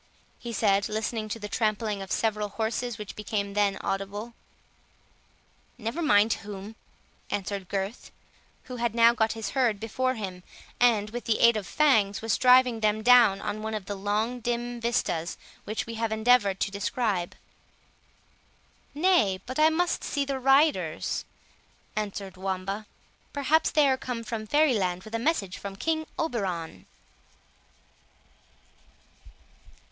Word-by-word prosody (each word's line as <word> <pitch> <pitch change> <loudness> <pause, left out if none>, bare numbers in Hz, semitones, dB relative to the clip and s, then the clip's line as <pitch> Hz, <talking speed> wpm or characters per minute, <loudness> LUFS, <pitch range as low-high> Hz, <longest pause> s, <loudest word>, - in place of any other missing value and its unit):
he 240 - -6
said, 200 -2 +2
listening 215 0 -2
to 220 - -3
the 210 -2 -6
trampling 215 -2 -1
of 195 - -8
several 210 -2 0
horses 225 +2 -2
which 210 -1 -8
became 205 -1 -3
then 200 -1 +2
audible. 200 +4 -4 1.4
"Never 235 +8 -4
mind 215 -7 +4
whom," 205 +1 -8 0.5
answered 195 -2 -3
Gurth, 195 +4 -4 0.5
who 250 - -8
had 235 -1 -1
now 235 0 +6
got 220 -2 +1
his 225 -2 -5
herd 240 -6 +1
before 255 +4 -1
him, 190 -5 -6 0.4
and, 220 -4 +3
with 240 +1 -6
the 225 - +1
aid 235 0 +6
of 205 -4 -3
Fangs, 220 -9 +3
was 225 -1 0
driving 250 -2 +5
them 215 0 +1
down 235 -5 +6 0.2
one 220 0 -3
of 210 -3 -5
the 205 - -4
long 210 +5 -1
dim 240 0 -3
vistas 175 -8 -1 0.3
which 215 +1 -3
we 230 - -7
have 225 -1 0
endeavoured 220 -3 +3
to - - 0
describe. 200 -3 -1 1.6
"Nay, 295 - +3
but 255 +3 -4
I 310 +1 +6
must 345 +2 0
see 285 -1 -1
the 275 -1 -3
riders," 265 - +2 0.7
answered 200 -3 -4
Wamba; 195 +2 -3 0.5
"perhaps 295 +3 +2
they 300 -2 +4
are 265 -1 +2
come 245 -3 -5
from 220 -1 -5
Fairy 295 +2 +4
land 185 -4 -1
with 215 - -12
a 230 - 0
message 230 - -1
from 200 -1 -7
King 315 +8 -1
Oberon." 180 - -3
220 Hz, 140 wpm, -27 LUFS, 200-245 Hz, 1.6 s, now